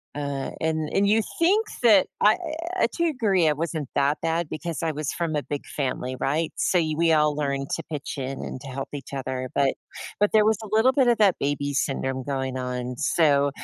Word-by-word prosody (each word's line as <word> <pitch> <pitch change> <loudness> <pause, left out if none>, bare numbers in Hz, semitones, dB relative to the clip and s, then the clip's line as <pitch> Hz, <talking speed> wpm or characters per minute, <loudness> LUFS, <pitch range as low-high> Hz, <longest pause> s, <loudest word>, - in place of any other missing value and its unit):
uh 140 -2 -3
and 160 -1 -1
and 200 0 +3
you 215 +1 +3 0.2
think 405 +6 +4 0.2
that 210 -5 +6 0.2
I 210 +1 +5 0.4
Eh, - - +5
to 340 - +2
agree 210 - +2
I 150 - +4
wasn't 155 -2 -3
that 140 +2 +2
bad, 165 0 0
because 165 -1 -4
I 160 - +1
was 150 -1 -3
from 165 -3 -2
a 150 - +1
big 145 -1 -5
family, 130 -2 -3
right? 155 +4 0
So, 180 - +1
you 155 -2 0
we 165 0 +3
all 150 -1 +3
learned 140 -2 -2
to - - -6
pitch 145 -1 -5
in 135 +1 -4
and - - -6
to 140 - -9
help 135 +1 -5
each 140 -2 -7
other, 130 -1 -3
but 140 -1 +3 0.5
but 205 0 +4
there 215 -1 +5
was 220 -1 +3
a - - -7
little 220 +4 +4
bit 265 -2 +3
of 235 - +4
that 200 -3 +4
baby 145 0 -1
syndrome 135 -1 -1
going 130 -1 -3
on. 125 0 -4
So, 145 -2 +3
150 Hz, 215 wpm, -25 LUFS, 135-180 Hz, 0.5 s, that